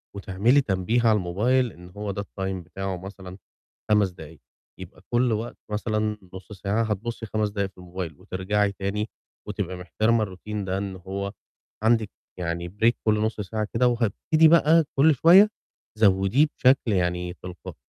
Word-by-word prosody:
وتعملي 100 +8 +2
تنبيه 105 +2 0
على 110 - +5
الموبايل 115 +8 +1
إن 90 +1 -13
هو 100 +1 -5
ده 100 +1 -4
الtime 95 -2 -5
بتاعُه 95 +1 -4
مثلًا 95 0 -10 0.5
5 105 -2 +4
دقايق، 80 -2 -12 0.4
يبقى 95 0 -11
كُلّ 120 0 +2
وقت 110 +2 -4
مثلًا 105 0 -1 0.2
نُصّ 95 +2 -11
ساعة 100 +4 -1
هتبُصّي 110 +2 -3
5 105 0 -1
دقايق 100 -1 -2
في - - -47
الموبايل، 90 -3 -6
وترجعي 100 +2 -1
تاني 100 +3 -3 0.4
وتبقى 95 -2 -4
مِحتِرمة 110 +6 +1
الروتين 100 +1 -5
ده 95 0 -1
إن 100 -1 -4
هو 100 +2 -5 0.5
عندِك 110 -2 +3 0.3
يعني 85 0 -3
break 120 +1 +6
كُلّ 105 -1 +3
نُصّ 110 -1 -1
ساعة 105 +1 -3
كده، 125 +2 +3
وهتبتدي 120 - +3
بقى 165 0 +5
كُلّ 150 +2 +5
شوية 185 - +7 0.5
زوّديه 100 +7 +4
بشكل 130 -3 +3
يعني 90 -1 -1
تلقائي، 90 -1 -8
100 Hz, 155 wpm, -25 LUFS, 95-115 Hz, 0.5 s, شوية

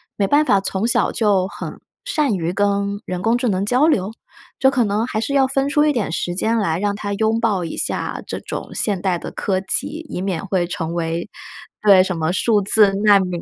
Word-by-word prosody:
没 200 - +1
办 290 +5 +4
法 200 -10 +3
从 195 +3 -2
小 - - +3
就 200 -4 +1
很 - - -8 0.3
善 300 - 0
于 170 -1 -2
跟 200 +1 0
人 180 0 -4
工 230 +3 +2
智 245 0 -1
能 195 -2 0
交 250 +8 +3
流？ 215 - +1 0.5
这 265 0 +3
可 250 -4 +2
能 210 +2 0
还 220 -3 -3
是 280 +5 -3
要 270 -1 +4
分 270 +1 0
出 300 0 +3
一 300 - +2
点 220 - -2
时 175 +1 -2
间 225 +5 0
来 170 -6 0
让 205 0 -1
他 205 -1 -4
拥 220 +2 0
抱 210 -6 0
一 165 - -6
下 - - -1
这 - - -5
种 - - -7
现 200 -4 +1
代 180 -2 -1
的 - - -7
科 190 -2 -2
技， 310 - -1
以 180 - -4
免 190 -3 -3
会 185 -2 0
成 170 -2 -4
为 170 +2 -3 0.5
对， 195 -3 +7
什 185 -2 -3
么 160 +1 0
数 210 +2 +2
字 205 +1 +4
难 205 -2 +6
民， 180 -2 -3
200 Hz, 240 characters per minute, -20 LUFS, 185-230 Hz, 0.5 s, 对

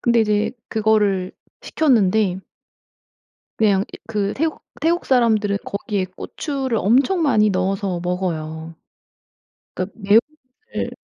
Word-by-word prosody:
근데 235 -1 +3
이제 210 -1 +1 0.2
그거를 210 -4 +1 0.3
시켰는데 210 - +2 1.2
그냥 200 -3 +3
이 - - -9
그 205 -2 -1
태국 315 +2 -2 0.2
태국 335 +3 +1
사람들은 220 -5 +2
거기에 200 -1 -2
고추를 265 - -4
엄청 270 - +3
많이 215 -8 +3
넣어서 190 -1 -1
먹어요. 165 -3 -3 1.0
그러니깐 195 +4 -5 0.5
매운맛을 440 - -6
210 Hz, 255 characters per minute, -21 LUFS, 190-240 Hz, 1.2 s, 근데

